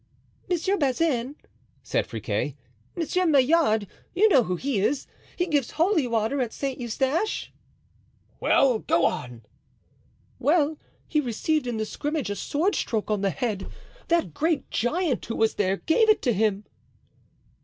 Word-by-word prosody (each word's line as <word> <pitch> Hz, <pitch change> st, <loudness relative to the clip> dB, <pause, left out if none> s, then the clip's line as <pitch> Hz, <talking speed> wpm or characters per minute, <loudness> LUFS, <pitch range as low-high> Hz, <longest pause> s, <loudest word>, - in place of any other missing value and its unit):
"Monsieur 375 Hz, +3 st, +1 dB
Bazin," 275 Hz, -2 st, 0 dB, 0.5 s
said -, -, -1 dB
Friquet, -, -, -3 dB, 0.4 s
"Monsieur 360 Hz, +1 st, 0 dB
Maillard—you 295 Hz, -, +2 dB
know 260 Hz, -, +5 dB
who 180 Hz, -, -1 dB
he 255 Hz, +3 st, -1 dB
is, 270 Hz, +8 st, 0 dB, 0.3 s
he 355 Hz, -, 0 dB
gives 290 Hz, -7 st, 0 dB
holy 330 Hz, -4 st, +2 dB
water 230 Hz, +4 st, 0 dB
at 235 Hz, -3 st, -2 dB
Saint 275 Hz, -2 st, -3 dB
Eustache——" 265 Hz, -, -1 dB, 0.9 s
"Well, 255 Hz, -5 st, +3 dB
go 170 Hz, -, +2 dB
on." 120 Hz, -2 st, -3 dB, 1.0 s
"Well, 300 Hz, +2 st, +2 dB, 0.3 s
he 305 Hz, -, +1 dB
received 275 Hz, +3 st, -1 dB
in 240 Hz, -2 st, -2 dB
the 220 Hz, -, -1 dB
scrimmage 290 Hz, -1 st, -3 dB
a -, -, -2 dB
sword 335 Hz, -, 0 dB
stroke 220 Hz, -2 st, -2 dB
on 210 Hz, -2 st, 0 dB
the 200 Hz, -, +2 dB
head. 210 Hz, -3 st, -3 dB, 0.4 s
That 340 Hz, -1 st, +1 dB
great 315 Hz, -3 st, -1 dB
giant 290 Hz, +3 st, 0 dB
who 230 Hz, -, -3 dB
was 225 Hz, 0 st, +2 dB
there 195 Hz, -1 st, 0 dB
gave 440 Hz, -, +2 dB
it 430 Hz, -, +4 dB
to 245 Hz, -, +2 dB
him." 210 Hz, -1 st, 0 dB
270 Hz, 145 wpm, -25 LUFS, 220-325 Hz, 1.0 s, know